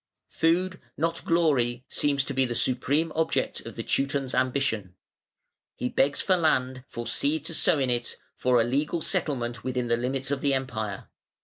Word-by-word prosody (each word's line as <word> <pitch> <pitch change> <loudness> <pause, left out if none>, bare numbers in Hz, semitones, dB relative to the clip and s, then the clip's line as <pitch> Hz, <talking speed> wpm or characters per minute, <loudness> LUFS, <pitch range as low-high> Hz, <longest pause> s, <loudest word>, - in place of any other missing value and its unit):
Food, 180 +3 +1 0.2
not 165 +2 -1
glory, 130 -8 +2
seems 140 -2 +1
to 140 - -4
be 135 0 +2
the 120 -2 -2
supreme 135 +7 +1
object 160 0 0
of - - -8
the - - -4
Teuton's 135 -1 0
ambition. 125 -8 0 0.8
He 125 - -2
begs 140 +2 +2
for 190 - +3
land, 130 -6 +1
for 120 - -6
seed 145 +6 0
to 165 - -4
sow 155 - +3
in 130 -3 +1
it, 120 -1 -2 0.2
for 125 -1 +2
a - - +4
legal 145 +7 0
settlement 120 -4 -1
within 125 -2 -2
the 115 - +3
limits 130 +2 -2
of 140 -1 -1
the 140 -1 +2
Empire. 110 -7 -4
135 Hz, 175 wpm, -27 LUFS, 120-150 Hz, 0.8 s, a